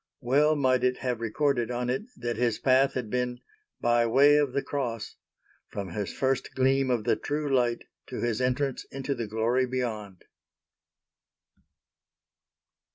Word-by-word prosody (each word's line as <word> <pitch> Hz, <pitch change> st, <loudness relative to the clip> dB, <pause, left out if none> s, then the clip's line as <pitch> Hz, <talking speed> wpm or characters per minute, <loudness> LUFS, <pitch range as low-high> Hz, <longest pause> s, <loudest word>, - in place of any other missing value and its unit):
Well 145 Hz, +5 st, +3 dB
might 130 Hz, -3 st, +2 dB
it 125 Hz, 0 st, +2 dB
have 125 Hz, -3 st, -3 dB
recorded 120 Hz, +1 st, 0 dB
on 125 Hz, 0 st, -2 dB
it 130 Hz, -, -1 dB
that 120 Hz, 0 st, -3 dB
his 120 Hz, -1 st, +1 dB
path 135 Hz, +1 st, +3 dB
had 120 Hz, -5 st, -3 dB
been 125 Hz, -1 st, -1 dB, 0.4 s
"by 120 Hz, 0 st, +3 dB
way 140 Hz, +5 st, +6 dB
of 145 Hz, -3 st, +2 dB
the 140 Hz, -, -1 dB
Cross," 115 Hz, -7 st, -4 dB, 0.5 s
from 100 Hz, -2 st, -5 dB
his 95 Hz, +1 st, -4 dB
first 135 Hz, -1 st, -1 dB
Gleam 135 Hz, 0 st, +2 dB
of 120 Hz, -4 st, +1 dB
the -, -, +2 dB
true 150 Hz, 0 st, -3 dB
Light 120 Hz, -2 st, +1 dB, 0.2 s
to -, -, -6 dB
his 120 Hz, 0 st, -1 dB
entrance 130 Hz, +1 st, 0 dB
into 135 Hz, +1 st, -4 dB
the 120 Hz, -4 st, -4 dB
Glory 115 Hz, +4 st, +1 dB
beyond. 110 Hz, -7 st, -4 dB
125 Hz, 150 wpm, -27 LUFS, 115-135 Hz, 0.5 s, way